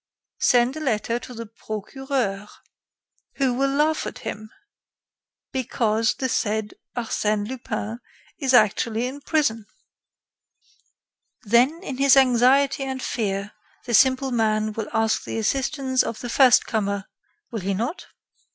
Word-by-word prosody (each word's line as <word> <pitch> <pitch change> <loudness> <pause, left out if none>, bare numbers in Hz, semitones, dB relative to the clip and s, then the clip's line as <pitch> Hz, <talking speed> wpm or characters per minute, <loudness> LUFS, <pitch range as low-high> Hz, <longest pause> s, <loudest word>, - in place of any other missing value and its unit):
"Send 245 +2 +3
a - - -5
letter 235 -4 -1
to 245 +1 -10
the 230 0 -6
Procureur." 215 0 -4 0.9
"Who 265 -3 +1
will 270 +2 +1
laugh 300 +3 +1
at - - -7
him, 215 +1 -6 1.0
because 225 -3 0
the 260 - -2
said 215 -3 -1 0.2
Arsène 215 -3 -1
Lupin 230 -2 -5 0.4
is 270 -4 0
actually 225 0 +3
in 270 +3 -6
prison. 230 -9 0 1.8
Then, 250 - +3
in 275 -8 -5
his 275 0 +5
anxiety 265 +2 +4
and 265 -1 -4
fear, 200 -5 -2 0.3
the 240 - -4
simple 260 +3 +4
man 215 -2 +1
will 220 0 -5
ask 225 -1 +1
the - - -5
assistance 260 +3 0
of 225 - -4
the 245 - -5
first 255 0 +5
comer, 200 -3 -2 0.5
will 225 - -3
he 195 +1 -1
not?" 240 - -4
240 Hz, 130 wpm, -23 LUFS, 215-265 Hz, 1.8 s, his